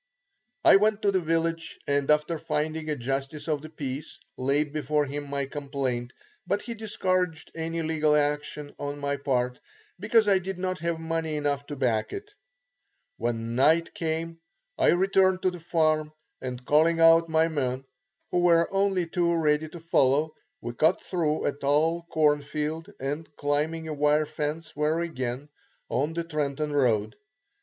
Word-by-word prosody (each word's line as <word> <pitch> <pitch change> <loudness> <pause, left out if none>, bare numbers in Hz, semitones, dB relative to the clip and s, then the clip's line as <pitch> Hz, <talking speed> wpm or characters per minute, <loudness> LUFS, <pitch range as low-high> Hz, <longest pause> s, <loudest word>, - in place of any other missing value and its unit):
I - - +9
went 210 +1 +1
to 200 - +4
the 190 - +2
village 165 0 -1
and 140 0 0
after 150 +2 +2
finding 155 +1 -2
a 150 - 0
justice 135 +4 -3
of 150 -3 0
the 155 - -9
peace, 145 -1 -6 0.2
laid 140 +3 0
before 150 0 0
him 145 +1 -5
my 140 -1 -1
complaint, 135 -4 -3 0.4
but 205 - 0
he 235 - -5
discouraged 185 -6 -1
any 165 0 -3
legal 155 -1 +2
action 145 0 -1
on 145 0 -4
my 140 0 -2
part 125 -2 -1 0.4
because 215 +2 +3
I 195 -2 +5
did 190 0 -5
not 185 0 -2
have 170 0 -2
money 160 -1 -2
enough 145 -1 -1
to 145 - -5
back 120 -5 0
it. 415 +1 -7 0.8
When 115 -1 -2
night 155 +7 +3
came, 165 -2 -3 0.4
I - - +2
returned 190 0 +3
to 185 - +3
the 180 - -8
farm 155 -2 +1 0.3
and 125 -1 -6
calling 160 +4 +4
out 165 0 +6
my 160 0 +3
men, 135 -4 -2 0.5
who 180 - +2
were 170 -1 +4
only 195 -2 +2
too 170 0 +1
ready 155 -1 +1
to 170 - -9
follow, 155 -2 +2 0.3
we 120 - -5
cut 160 +9 +3
through 160 -4 -1
a - - +2
tall 155 +4 +1
corn 150 -2 +3
field, 155 +5 -4
and 145 +4 -4
climbing 155 +3 -1
a 155 - -3
wire 150 +1 +2
fence 155 +2 -4
were 150 +2 +1
again 135 -4 -3 0.4
on 150 +5 0
the 170 +1 -2
Trenton 150 -2 -2
road. 110 -7 +2
155 Hz, 165 wpm, -27 LUFS, 145-165 Hz, 0.8 s, I